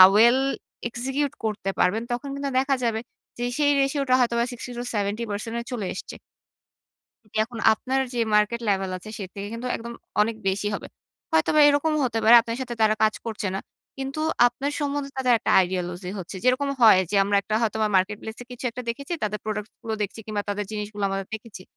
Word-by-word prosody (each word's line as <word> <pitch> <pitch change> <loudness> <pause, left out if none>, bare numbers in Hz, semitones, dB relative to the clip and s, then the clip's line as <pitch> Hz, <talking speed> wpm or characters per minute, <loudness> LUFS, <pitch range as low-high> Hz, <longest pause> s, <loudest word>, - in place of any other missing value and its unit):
well 235 +4 +6 0.5
execute 265 +4 -2
করতে 210 -3 -2
পারবেন, 210 +5 +2
তখন 245 +3 -3
কিন্তু 280 0 -2
দেখা 270 +1 +2
যাবে 225 -2 +1 0.4
যে 240 - -1
সেই 290 -1 +4
ratio 275 +1 +1
টা - - +5
হয়তো 235 -1 +2
বা 235 - +3
60-70 230 -2 -3
এ - - -3
চলে 220 -6 -2
এসছে। - - -7 1.1
জি - - -24 0.2
এখন 230 +1 -8
আপনার 260 +4 -1
যেই 235 -2 +1
market 210 +3 +3
level 195 -1 +1
আছে 200 +4 -11
সে - - -3
থেকে 200 0 -5
কিন্তু 235 +2 -4
একদম 235 +1 -7 0.3
অনেক 225 +2 +1
বেশি 195 +2 0
হবে। 205 - -4 0.4
হয়তোবা 160 - +3
এরকমও 300 +2 +2
হতে 230 -2 -1
পারে 225 +2 +9
আপনার 230 0 -4
সাথে 240 -2 -4
তারা 215 0 +4
কাজ 215 0 +4
করছে 220 -3 -3
না। - - -1 0.4
কিন্তু 270 +2 -4 0.3
আপনার 270 +4 -3
সম্বন্ধে 285 -1 -2
তাদের 255 -2 +3
একটা - - 0
ideology 180 0 -4
হচ্ছে। 185 +2 -7
যেরকম 255 +3 +3
হয় 220 -5 +8
যে - - +1
আমরা 200 +1 +2 0.2
হয়তোবা 220 -1 +1
Marketplace 210 +4 0
এ - - -22
কিছু 245 - -9
একটা 250 +2 -6
দেখেছি, 280 +8 -4
তাদের 210 0 -1
product 210 0 -3
গুলো 225 -2 -3
দেখছি 205 +2 -3
কিংবা 215 -1 -2
তাদের 205 0 -2
জিনিসগুলো 210 -1 -4
আমরা 195 0 -1
দেখেছি। 220 -4 -7
225 Hz, 185 wpm, -25 LUFS, 210-250 Hz, 1.1 s, পারে